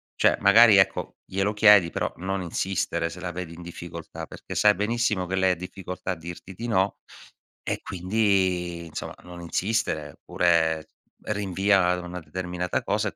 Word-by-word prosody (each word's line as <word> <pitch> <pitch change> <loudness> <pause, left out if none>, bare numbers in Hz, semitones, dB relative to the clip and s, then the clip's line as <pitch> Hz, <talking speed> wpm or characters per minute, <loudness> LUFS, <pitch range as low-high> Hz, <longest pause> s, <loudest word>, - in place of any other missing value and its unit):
Cioè, - - +3
magari 105 +1 +7
ecco, 95 - +1
glielo 100 +2 -1
chiedi, 105 -5 +6
però - - -2
non 95 +2 -3
insistere 85 -1 -2
se 90 - -9
la 90 -1 -4
vedi 85 -1 -6
in 85 - -11
difficoltà, 85 -1 -8
perché - - -9
sai 105 0 +5
benissimo 105 -2 0
che 95 - -2
lei 95 -1 +3
difficoltà 90 +1 -6
a - - -7
dirti 85 +3 -9
di 115 - -6
no 95 -3 +1 0.7
e - - -3
quindi 90 -3 0
insomma, 80 - -7
non 90 0 -10
insistere, 85 -5 -1
oppure 80 -2 +1 0.4
rinvia 100 -2 +2
a 90 0 +1
una 90 0 -6
determinata 90 +1 -3
cosa 105 +1 0
e - - -17
90 Hz, 160 wpm, -25 LUFS, 85-100 Hz, 0.7 s, magari